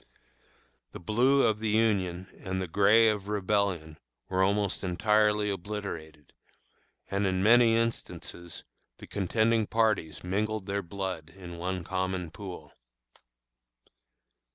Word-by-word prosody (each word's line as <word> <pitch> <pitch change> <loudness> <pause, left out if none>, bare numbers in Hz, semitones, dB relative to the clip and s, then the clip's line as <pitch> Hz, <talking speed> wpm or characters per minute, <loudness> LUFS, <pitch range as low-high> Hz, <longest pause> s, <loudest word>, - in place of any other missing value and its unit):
The - - -7
blue 125 +9 +3
of 110 -1 +2
the 110 0 -1
Union 100 -5 +1
and 95 0 -3
the 95 - -2
gray 105 +6 +5
of 105 -2 0
Rebellion 100 -6 -1 0.3
were 95 0 +1
almost 100 +1 +1
entirely 105 +2 +2
obliterated, 85 -6 -6 0.8
and, 100 0 +1
in 95 0 0
many 115 +1 +6
instances, 115 -7 -3 0.3
the - - -11
contending 110 +3 +1
parties 110 -9 0
mingled 105 +3 -1
their 100 0 -2
blood 95 -3 -5
in 85 -1 -10
one 90 0 -3
common 95 -1 -2
pool. 90 -5 -9
100 Hz, 115 wpm, -29 LUFS, 90-105 Hz, 0.8 s, many